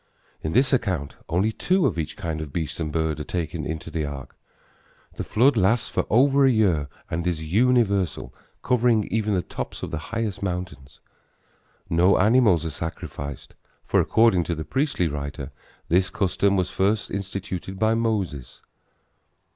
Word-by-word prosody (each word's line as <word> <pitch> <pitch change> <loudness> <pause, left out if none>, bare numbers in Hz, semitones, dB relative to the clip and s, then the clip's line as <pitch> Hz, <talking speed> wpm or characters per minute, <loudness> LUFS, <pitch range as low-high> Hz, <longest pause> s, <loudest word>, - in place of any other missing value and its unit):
In 80 - -3
this 135 +5 +3
account 95 - 0 0.2
only 95 +6 +2
two 185 - +1
of - - 0
each 80 - -4
kind 80 -2 -3
of 75 -3 -6
beast 80 +2 -3
and 80 -2 -2
bird 80 -1 -1
are - - -3
taken 80 -1 -3
into 80 +1 -5
the 80 0 -2
ark. 70 -2 -7 0.8
The - - -4
flood 130 +5 +3
lasts 110 +3 +2
for - - -1
over 140 +4 +4
a 135 - +6
year 90 - +2 0.2
and 85 +2 -1
is 80 -3 -1
universal, 100 - +1 0.3
covering 120 -3 +3
even 105 -2 +1
the 90 - 0
tops - - -6
of 90 - -4
the 80 - -3
highest 115 -3 -2
mountains. 85 -8 -5 0.9
No 90 +4 +4
animals 105 -5 +4
are 80 - -2
sacrificed, 70 -3 -6 0.3
for - - +2
according 110 -5 +4
to 85 - -2
the 80 0 -5
priestly 130 - 0
writer 70 -1 -5 0.4
this 90 +3 +2
custom 100 +2 +1
was 90 -1 0
first 100 +2 0
instituted 95 -1 -5
by 110 +2 +2
Moses. 105 - -2
90 Hz, 160 wpm, -24 LUFS, 80-110 Hz, 0.9 s, a